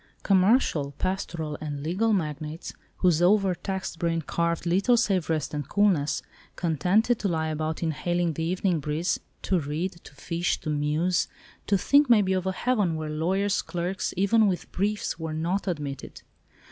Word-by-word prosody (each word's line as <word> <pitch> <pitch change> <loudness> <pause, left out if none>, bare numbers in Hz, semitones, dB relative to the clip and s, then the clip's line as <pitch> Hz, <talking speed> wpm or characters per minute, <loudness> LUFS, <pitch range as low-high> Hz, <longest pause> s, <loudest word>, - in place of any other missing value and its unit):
Commercial, 185 - +3
pastoral 170 -5 -3
and 145 -2 -4
legal 190 +8 +1
magnates, 155 -3 -3 0.2
whose 175 -3 +3
over 195 +1 +4
taxed 190 -2 -5
brain 165 -1 0
craved 170 +2 -1
little 195 +8 +3
save 195 -7 +1
rest 155 -3 -1
and 145 -3 -4
coolness—contented 185 - +1
to 205 - 0
lie 160 -3 -1
about 155 +1 -2
inhaling 175 +1 0
the 160 - -4
evening 180 0 0
breeze—to 160 +4 -2
read, 155 +5 -2
to 145 - -14
fish, 170 +4 -1
to 155 - -3
muse, 150 +5 +1 0.4
to 200 - +3
think 285 +8 +4
maybe, 205 -5 +5
of 185 0 -1
a - - +2
heaven, 205 -5 0
where 155 -1 -4
lawyers' 190 +6 0
clerks, 180 +2 -3
even 210 +3 +4
with 185 -3 -2
briefs, 205 -2 -1
were 160 -1 -4
not 175 +6 -1
admitted. 145 -6 -5
175 Hz, 150 wpm, -26 LUFS, 155-195 Hz, 0.4 s, maybe